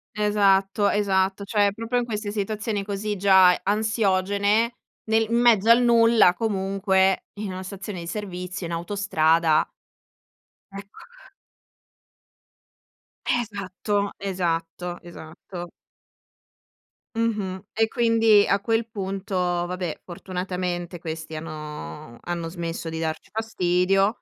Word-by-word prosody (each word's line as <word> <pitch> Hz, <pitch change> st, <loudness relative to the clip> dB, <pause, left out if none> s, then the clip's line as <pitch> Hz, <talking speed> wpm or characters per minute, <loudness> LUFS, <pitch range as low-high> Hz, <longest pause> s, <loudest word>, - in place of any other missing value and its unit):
Esatto. 205 Hz, -1 st, +3 dB
Esatto. 195 Hz, -1 st, +1 dB
Cioè, 205 Hz, 0 st, +2 dB
proprio 230 Hz, +3 st, -2 dB
in 245 Hz, -, -2 dB
queste 210 Hz, -3 st, -4 dB
situazioni 210 Hz, 0 st, -2 dB
così 205 Hz, +1 st, -3 dB
già 190 Hz, -2 st, +6 dB
ansiogene, 205 Hz, +1 st, +1 dB, 0.4 s
nel 220 Hz, 0 st, +4 dB
in 235 Hz, -, +2 dB
mezzo 225 Hz, -3 st, +4 dB
al 235 Hz, +1 st, +7 dB
nulla, 230 Hz, -5 st, +5 dB
comunque, 195 Hz, -2 st, +1 dB
in 205 Hz, -2 st, -4 dB
una 185 Hz, 0 st, -6 dB
stazione 195 Hz, 0 st, -7 dB
di 170 Hz, -, -7 dB
servizio, 180 Hz, -2 st, -5 dB
in 170 Hz, -, -5 dB
autostrada 170 Hz, -3 st, +2 dB, 1.0 s
Ecco. 200 Hz, 0 st, -11 dB, 2.2 s
Esatto, 205 Hz, -3 st, -1 dB
esatto, 175 Hz, -2 st, -2 dB
esatto. 175 Hz, +1 st, -9 dB, 1.5 s
Mh-mh. 210 Hz, -5 st, -1 dB
E, 225 Hz, 0 st, +2 dB
quindi, 225 Hz, -3 st, +4 dB
a 200 Hz, -, +2 dB
quel 225 Hz, +2 st, 0 dB
punto, 195 Hz, -2 st, -5 dB
vabbè, 175 Hz, -1 st, -2 dB
fortunatamente 180 Hz, -1 st, -4 dB
questi 160 Hz, -1 st, -6 dB
hanno 155 Hz, -4 st, -8 dB
hanno 170 Hz, -1 st, -4 dB
smesso 170 Hz, -1 st, -5 dB
di 160 Hz, 0 st, -5 dB
darci 160 Hz, -1 st, -4 dB
fastidio. 195 Hz, -1 st, +1 dB
195 Hz, 105 wpm, -24 LUFS, 175-210 Hz, 2.2 s, al